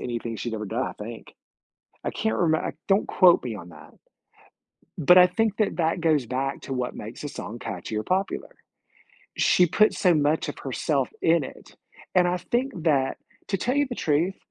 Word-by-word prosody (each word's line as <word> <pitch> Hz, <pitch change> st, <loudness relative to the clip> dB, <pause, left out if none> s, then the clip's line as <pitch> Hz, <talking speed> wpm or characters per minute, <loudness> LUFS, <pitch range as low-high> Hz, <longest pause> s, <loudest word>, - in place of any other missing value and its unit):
anything 120 Hz, -2 st, -4 dB
she'd 115 Hz, +1 st, -4 dB
ever 110 Hz, -1 st, -4 dB
done, 115 Hz, +6 st, -2 dB
I -, -, -5 dB
think. 115 Hz, +2 st, -9 dB, 0.7 s
I -, -, -1 dB
can't 110 Hz, 0 st, -1 dB
reme 160 Hz, +3 st, +1 dB
don't 195 Hz, +1 st, +3 dB
quote 180 Hz, -2 st, +5 dB
me 120 Hz, -3 st, -4 dB
on 90 Hz, -2 st, -10 dB
that. 80 Hz, -, -14 dB, 1.1 s
But 175 Hz, +3 st, +6 dB
I 180 Hz, -, +9 dB
think 220 Hz, +3 st, 0 dB
that 215 Hz, -, +1 dB
that 165 Hz, 0 st, 0 dB
goes 155 Hz, -6 st, +2 dB
back 135 Hz, +3 st, -3 dB
to 135 Hz, -, -6 dB
what 125 Hz, -1 st, -3 dB
makes 110 Hz, +6 st, -8 dB
a 145 Hz, -, -4 dB
song 120 Hz, -4 st, -7 dB
catchy 95 Hz, +4 st, -5 dB
or -, -, -2 dB
popular. 190 Hz, -, -1 dB, 0.9 s
She 180 Hz, -, +4 dB
put 215 Hz, +6 st, +3 dB
so 180 Hz, -3 st, +3 dB
much 150 Hz, +1 st, +1 dB
of 145 Hz, -, -6 dB
herself 135 Hz, +1 st, -1 dB
in 165 Hz, -1 st, +4 dB
it, -, -, -12 dB, 0.4 s
and 180 Hz, -1 st, +4 dB
I 180 Hz, -, 0 dB
think 250 Hz, +8 st, -1 dB
that 140 Hz, -5 st, +2 dB, 0.3 s
to 195 Hz, -, 0 dB
tell 245 Hz, +7 st, -1 dB
you 285 Hz, -1 st, +3 dB
the 245 Hz, -, -4 dB
truth, 165 Hz, +6 st, 0 dB
150 Hz, 190 wpm, -25 LUFS, 120-180 Hz, 1.1 s, I